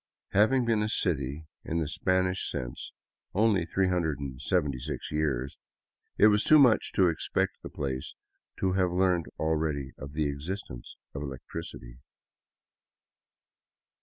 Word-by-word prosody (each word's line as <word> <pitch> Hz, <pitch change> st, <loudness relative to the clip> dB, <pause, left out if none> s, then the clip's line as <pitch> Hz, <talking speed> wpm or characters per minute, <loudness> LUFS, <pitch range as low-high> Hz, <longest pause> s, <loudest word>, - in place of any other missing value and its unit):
Having 120 Hz, +6 st, +4 dB
been 115 Hz, -2 st, +2 dB
a 105 Hz, -, 0 dB
city, 70 Hz, -3 st, -1 dB, 0.2 s
in 85 Hz, -, -2 dB
the 80 Hz, -3 st, 0 dB
Spanish 95 Hz, +3 st, 0 dB
sense, -, -, -5 dB, 0.4 s
only 100 Hz, -5 st, +3 dB
376 70 Hz, -8 st, -1 dB
years, 70 Hz, -4 st, -1 dB, 0.6 s
it -, -, +6 dB
was 105 Hz, 0 st, +5 dB
too 155 Hz, -, +7 dB
much 125 Hz, -6 st, +5 dB
to 95 Hz, -3 st, +4 dB
expect 80 Hz, -3 st, -1 dB
the -, -, -7 dB
place 65 Hz, -2 st, -4 dB, 0.4 s
to 95 Hz, -, +1 dB
have 90 Hz, -1 st, +2 dB
learned 90 Hz, -2 st, +2 dB
already 80 Hz, -3 st, -1 dB
of 70 Hz, +1 st, -8 dB
the 75 Hz, -1 st, 0 dB
existence 70 Hz, -, -6 dB, 0.2 s
of 70 Hz, -, -5 dB
electricity. 65 Hz, -3 st, -7 dB
80 Hz, 120 wpm, -29 LUFS, 70-95 Hz, 0.6 s, too